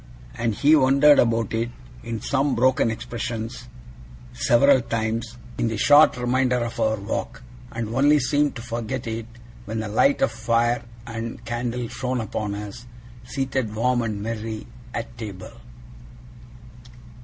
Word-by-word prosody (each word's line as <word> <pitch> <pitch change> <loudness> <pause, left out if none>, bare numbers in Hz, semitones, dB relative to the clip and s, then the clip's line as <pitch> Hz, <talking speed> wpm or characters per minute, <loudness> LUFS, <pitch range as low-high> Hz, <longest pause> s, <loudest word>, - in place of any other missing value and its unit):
And 115 -2 -1
he 150 +7 +5
wondered 140 +1 +6
about 115 -2 +2
it, 115 +1 0 0.3
in 115 -1 -4
some 140 0 +1
broken 125 -1 +3
expressions, 115 +1 -5 0.7
several 125 - +4
times, 115 0 -3 0.2
in - - +1
the 115 -1 -2
short 145 +4 +6
remainder 125 +1 +1
of 120 0 -3
our 110 -1 +2
walk; 100 0 -4 0.3
and 115 -1 -3
only 140 +6 +4
seemed 145 +2 +1
to 115 - -7
forget 120 +1 -4
it 115 0 -4 0.4
when 110 +2 -3
the 110 - -3
light 115 +7 +3
of - - +2
fire 115 +1 +1 0.2
and 115 0 -6
candle 120 +1 -3
shone 130 +1 -3
upon 105 -2 -3
us, 105 +3 -8 0.4
seated 130 -4 -2
warm 125 +2 +2
and 105 -3 -3
merry, 110 -1 -4 0.3
at 120 0 -5
table. 100 -5 -7
115 Hz, 140 wpm, -24 LUFS, 110-125 Hz, 0.7 s, wondered